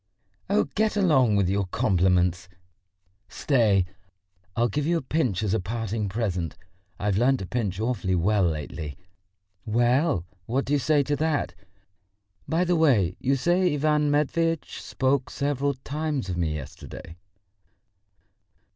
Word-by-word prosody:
"Oh, 205 +1 +3
get 215 0 +1
along 135 - +4
with 100 -2 +2
your 100 0 0
compliments! 90 -1 +1 0.8
Stay, 110 - +2 0.7
I'll 120 +1 +2
give 145 +7 -2
you 170 0 +2
a - - -2
pinch 125 - 0
as 105 -2 0
a 110 - +2
parting 110 +1 -3
present. 95 -6 -2 0.4
I've 100 0 0
learnt 130 +3 +3
to 95 - -5
pinch 105 -3 -2
awfully 110 -5 0
well 100 +4 +2
lately. 75 -2 -4 0.7
Well, 120 - +1 0.2
what 130 +4 0
do 145 - -1
you 145 - +3
say 145 +2 +2
to 145 +2 -1
that? 155 -1 0 0.9
By 165 +2 +1
the 180 0 +1
way, 115 - +3
you 135 +2 +1
say 175 +6 +2
Ivan 150 0 +2
Matveitch 165 +2 0
spoke 130 0 0
several 140 0 -1
times 145 -3 -3
of 90 - -2
me 80 -3 -1
yesterday?" 75 +3 -9
120 Hz, 140 wpm, -25 LUFS, 95-145 Hz, 0.9 s, along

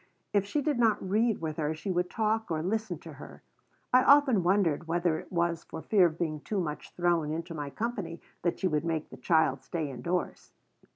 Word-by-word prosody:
If 200 -1 +2
she 290 +7 -1
did 290 -4 0
not 220 -4 +2
read 220 +2 +1
with 155 -2 -3
her 155 0 -1
she 155 +5 -4
would 180 0 0
talk 220 0 0
or 160 -1 -1
listen 220 +4 -1
to - - -10
her. - - -12 0.5
I 255 - +7
often 280 -7 +6
wondered 175 -3 +2
whether 170 -1 +1
it - - -12
was 170 -1 0
for 160 - -8
fear 195 -5 +5
of 160 -1 -6
being 155 -3 -2
too 200 +7 -3
much 155 -4 -4
thrown 175 -3 +1
into 165 +2 -4
my 145 -3 -4
company 205 -2 -4 0.2
that 175 - 0
she 190 - +1
would 150 -4 0
make 160 -2 -2
the - - -9
child 160 -5 +2
stay 155 -4 -3
indoors. 170 +8 -3
175 Hz, 210 wpm, -29 LUFS, 160-205 Hz, 0.5 s, I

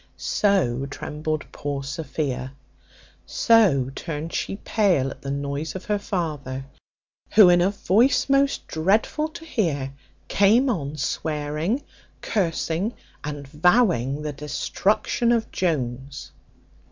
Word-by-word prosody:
So 140 - +1
trembled 150 +2 -4
poor 140 -1 -4
Sophia, 140 -3 -3 0.7
so 180 - +3
turned 160 +1 -5
she - - -2
pale 185 -11 +1
at - - -11
the 140 - -6
noise 140 +3 -3
of 190 - -6
her 210 -1 0
father, 150 -9 -3 0.7
who, 205 -4 +9
in 175 0 +5
a 180 - +3
voice 210 +5 +2
most 275 0 +2
dreadful 210 - +1
to 325 +1 -11
hear, 145 - -1 0.3
came 230 +7 +4
on 150 -7 -3
swearing, 150 - -2 0.4
cursing, 180 +2 -1 0.3
and 145 -1 -5
vowing 150 - +2
the 150 -1 -3
destruction 210 - 0
of 230 -2 0
Jones. 135 -5 -2
160 Hz, 115 wpm, -24 LUFS, 140-205 Hz, 0.7 s, who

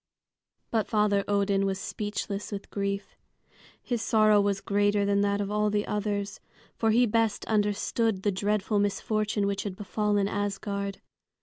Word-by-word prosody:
But 220 -2 +1
Father 210 -2 +2
Odin 200 -1 +2
was 195 -1 -1
speechless 205 0 -4
with 200 -1 -6
grief. 200 0 -3 0.7
His 240 -3 -2
sorrow 215 -2 +4
was 200 -1 0
greater 205 +1 +1
than 200 0 +2
that 200 0 +1
of 205 0 -2
all 210 0 +2
the 205 0 0
others, 205 -1 -2 0.4
for 225 - +1
he 240 +3 +5
best 225 -2 +1
understood 210 0 0
the 205 - +2
dreadful 205 +2 0
misfortune 210 +1 0
which 200 0 -1
had 200 -3 -5
befallen 205 0 0
Asgard. 200 -1 -3
205 Hz, 145 wpm, -28 LUFS, 200-210 Hz, 0.7 s, he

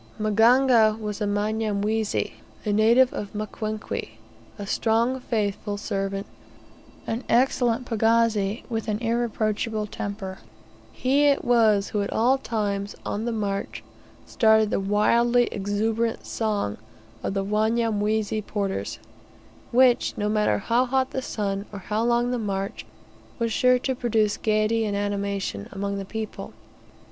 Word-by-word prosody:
Maganga 225 +1 +4
was 210 -1 -5
a - - +1
Mnyamwezi, 210 +1 -1 0.3
a 210 - +1
native 235 +4 +4
of 205 - -5
Mkwenkwe, 215 - -4 0.5
a 205 - -6
strong, 230 +5 +1
faithful 205 -3 -2
servant, 195 -1 -3 0.8
an 230 +3 -3
excellent 245 0 +2
pagazi, 225 -2 +1
with 225 -1 -3
an 210 -1 0
irreproachable 225 -2 -1
temper. 200 -2 -6 0.5
He 275 +3 +2
it 285 -1 +3
was 220 -4 +3
who 210 - -1
at 200 - -3
all 255 +4 +3
times, 205 -5 -2
on 215 +2 -2
the 240 - -1
march, 200 -3 -3 0.4
started 220 -2 +3
the - - +1
wildly 235 +5 +3
exuberant 220 +3 -1
song 210 - -2 0.4
of 195 - -3
the 195 0 0
Wanyamwezi 215 0 0
porters, 200 -2 -3 0.7
which, 250 0 +3
no 210 - -1
matter 210 - +2
how 235 - +1
hot 260 +1 +1
the 265 - -2
sun, 200 -4 -3
or 205 - -7
how 210 +3 -2
long 240 +1 +2
the 250 - -1
march, 195 -2 -3 0.5
was 230 -2 -1
sure 250 +2 +4
to 260 +1 -1
produce 225 -4 +1
gaiety 215 +1 +1
and 205 -2 -1
animation 200 - -2
among 200 0 -3
the 195 - -5
people. 220 +2 -6
215 Hz, 135 wpm, -25 LUFS, 205-230 Hz, 0.8 s, Maganga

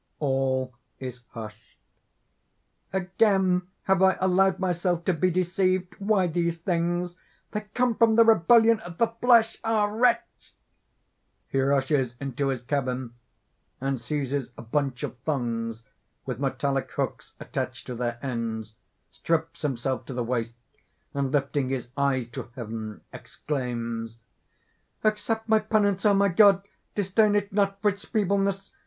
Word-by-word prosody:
All 130 -2 0 0.2
is 125 -1 -7
hushed._) 110 -2 -10 1.1
"Again 190 -1 +2 0.2
have 190 -1 +2
I 190 0 +5
allowed 190 0 +3
myself 175 -2 0
to 185 - +3
be 180 +3 +2
deceived! 185 +1 0
Why 200 -2 +2
these 170 0 0
things? 175 +1 -1 0.3
They 210 - -2
come 250 -1 +3
from 225 0 +4
the 230 - +8
rebellion 225 +2 +5
of 175 -5 -10
the 230 - +4
flesh. 230 -1 +3
Ah! 225 -2 +2
wretch!" 235 +3 0 1.0
(_He 135 0 +2
rushes 135 -3 +1
into 135 0 -2
his 130 -3 -2
cabin, 130 -2 -2 0.7
and 135 -2 -2
seizes 135 0 -2
a - - -8
bunch 135 +1 -1
of 125 - -5
thongs, 115 -5 -2 0.4
with 125 -3 -4
metallic 135 0 -1
hooks - - -3
attached - - -4
to 125 - -5
their 120 0 -2
ends, 115 -3 -3 0.4
strips 165 -1 -2
himself 130 -2 -2
to 135 - -5
the 125 - -1
waist 115 -1 -2 0.6
and, 140 -2 -1
lifting 140 -2 0
his 130 -2 -3
eyes 140 -4 +1
to 120 - -7
heaven 110 -3 -6
exclaims_:) 115 -5 -4 0.9
"Accept 220 +1 0
my 220 -1 +5
penance, 210 -2 +2
O 205 - +5
my 200 0 +4
God: 195 +1 +6 0.3
disdain 205 +1 +3
it 205 -1 0
not 200 -1 +1
for 210 - +5
its 200 0 -6
feebleness. 195 -2 0
165 Hz, 135 wpm, -26 LUFS, 130-200 Hz, 1.1 s, the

